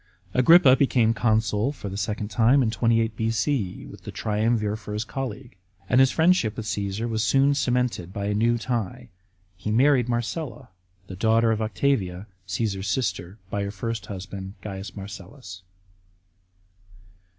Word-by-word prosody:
Agrippa 135 +1 +7
became 120 -5 +3
consul 110 +1 +1
for 140 - -8
the 95 - -5
second 105 +1 -3
time 125 +4 +4
in 110 - 0
28 115 0 +1
B.O., 110 -1 -1
with - - -13
the - - -7
triumvir 105 0 0
for 105 -1 -8
his 105 +1 -1
colleague; 125 +1 -6 0.3
and 125 - +3
his 135 0 +6
friendship 160 - +2
with 115 - -4
Caesar 105 +1 -2
was 110 -2 -1
soon 135 +4 +3
cemented 125 - -1
by 100 +1 -4
a 105 - 0
new 115 +3 +2
tie. 120 0 -3 0.5
He 95 +3 -5
married 125 +2 +3
Marcella, 125 +3 -3 0.4
the 95 - -8
daughter 115 +3 +3
of 110 0 -1
Octavia, 105 -4 -1 0.2
Caasar's 95 0 -2
sister, 95 -5 -2
by 100 - -1
her 100 - -3
first 115 +3 -4
husband, 95 0 -7
C. 95 -1 -6
Marcellus. 100 0 -9
110 Hz, 150 wpm, -25 LUFS, 100-125 Hz, 0.5 s, Agrippa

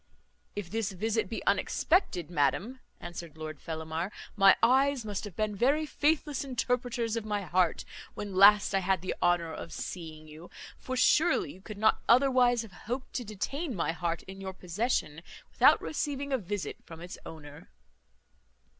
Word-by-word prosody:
"If 200 -4 -5
this 220 -2 -2
visit 220 +1 -1
be 225 - -5
unexpected, 205 - +1
madam," 180 - 0 0.2
answered 170 -2 -8
Lord 155 -1 -7
Fellamar, 160 +3 -4 0.2
"my 195 -2 +7
eyes 265 +1 +3
must 205 0 -4
have 200 -5 -9
been 215 -1 -1
very 280 +9 +2
faithless 295 -1 0
interpreters 245 -3 -1
of 230 - -2
my 210 -1 -2
heart, 180 0 +1 0.3
when 205 -2 -5
last 200 +2 +6
I 195 - +3
had 190 -1 0
the 185 - -2
honour 170 -2 +2
of 165 - -7
seeing 160 -3 -7
you; 155 +3 -12 0.3
for 255 0 -5
surely 315 +6 +3
you 185 - -16
could 215 +1 -9
not 220 +1 +3
otherwise 250 -2 +4
have 220 - -12
hoped 250 +8 -6
to 250 - -2
detain 245 - -4
my 165 -3 0
heart 170 -1 -3
in 195 +1 -10
your 190 -1 -5
possession, 180 -4 -2 0.3
without - - +6
receiving 280 -2 -3
a 265 - +2
visit 195 -5 -4
from 165 -1 -11
its 175 +1 -9
owner." 145 - -11
205 Hz, 165 wpm, -30 LUFS, 175-245 Hz, 0.3 s, my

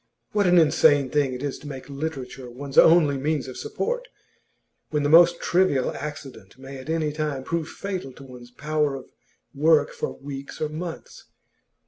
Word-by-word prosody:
What 205 -2 +2
an 180 0 +5
insane 150 -4 +4
thing 145 -3 +1
it 125 - -7
is 140 -2 -3
to 150 - -11
make 135 -3 -8
literature 135 -3 -6
one's 135 +3 -8
only 160 -4 +6
means 145 0 -1
of 130 - -8
support! - - -3 0.8
When 150 -1 -1
the 145 - +1
most 170 +2 +6
trivial 170 -8 +2
accident 135 -9 -8
may 135 +1 -9
at 130 - -10
any 160 -2 0
time 150 -3 -3
prove 165 +2 -2
fatal 185 -8 -5
to 140 - -13
one's 125 -2 -12
power 150 +2 -1
of 130 - -10 0.4
work 150 0 +3
for - - -5
weeks 140 0 -8
or 155 - -1
months. 165 +2 -7
145 Hz, 170 wpm, -24 LUFS, 135-160 Hz, 0.8 s, only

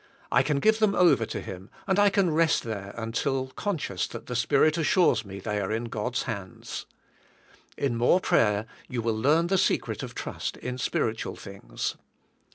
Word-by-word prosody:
I - - +5
can 145 -2 0
give 220 +6 +3
them 215 -2 +3
over 170 -11 +4
to - - -4
Him 95 +1 -8 0.2
and 190 0 +2
I 205 0 +6
can 195 -3 +2
rest 165 0 +3
there 100 -3 -5
until 130 +4 -1
conscious 145 - -2
that 115 - -8
the 125 - -5
Spirit 140 +5 +3
assures 160 - +3
me 100 -1 -8
they 105 +1 -2
are 95 - -2
in 110 +2 -1
God's 115 +1 -2
hands. 100 -7 -6 0.9
In 135 -4 0
more 120 +10 +4
prayer 105 - +2 0.2
you 120 -2 -3
will 115 0 +1
learn 150 +9 +3
the 190 +2 +2
secret - - 0
of - - -7
trust - - -4
in 125 0 -5
spiritual 115 -2 -1
things. 100 -1 -5
120 Hz, 175 wpm, -27 LUFS, 110-165 Hz, 0.9 s, I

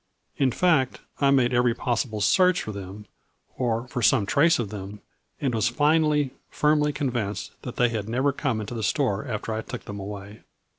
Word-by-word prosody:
In 135 - +3
fact 150 -4 +2 0.2
I 140 - +4
made 130 -2 +3
every 120 -1 +3
possible 115 -3 -2
search 180 - +4
for 110 - -5
them, 100 +1 -8 0.5
or 120 -1 -1
for 125 0 -4
some 115 -1 +4
trace 160 +11 +4
of 115 -5 -3
them, 100 0 -7 0.4
and 135 -3 -1
was 110 -1 +2
finally, 150 +1 +2 0.2
firmly 150 0 +2
convinced 120 -8 -3
that 125 - -7
they 120 0 +3
had 110 -2 -4
never 130 +5 +1
come 135 -5 -2
into 105 +2 -5
the 115 - -4
store 110 +3 0
after 110 -1 -3
I 110 - -2
took - - -7
them 105 0 -6
away. 100 +1 -8
120 Hz, 185 wpm, -25 LUFS, 105-140 Hz, 0.5 s, I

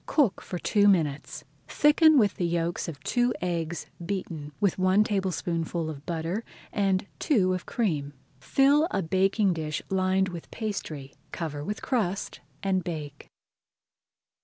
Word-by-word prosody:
Cook 270 -11 +2
for 180 - -5
two 205 +3 +3
minutes. 155 -7 +1 0.2
Thicken 305 +1 +5
with 210 -6 +3
the 175 - 0
yolks 170 0 -1
of 155 -4 -6
two 245 0 +1
eggs 170 -2 -2 0.2
beaten 165 -5 -4
with 200 -2 +1
one 185 +3 +4
tablespoonful 175 -5 -1
of 145 -1 -11
butter 170 +6 -2 0.3
and 195 -2 +1
two 190 -10 +2
of 185 - -4
cream. 150 -11 -1 0.3
Fill 280 - +4
a 195 - -1
baking 190 +3 +2
dish 155 -2 -3
lined 190 0 +2
with 175 -2 -8
pastry, 160 - -5 0.2
cover 150 -4 -4
with 210 +7 -4
crust, 200 -7 -1 0.2
and 190 -2 +1
bake. 150 -5 -6
185 Hz, 135 wpm, -27 LUFS, 165-205 Hz, 0.3 s, Thicken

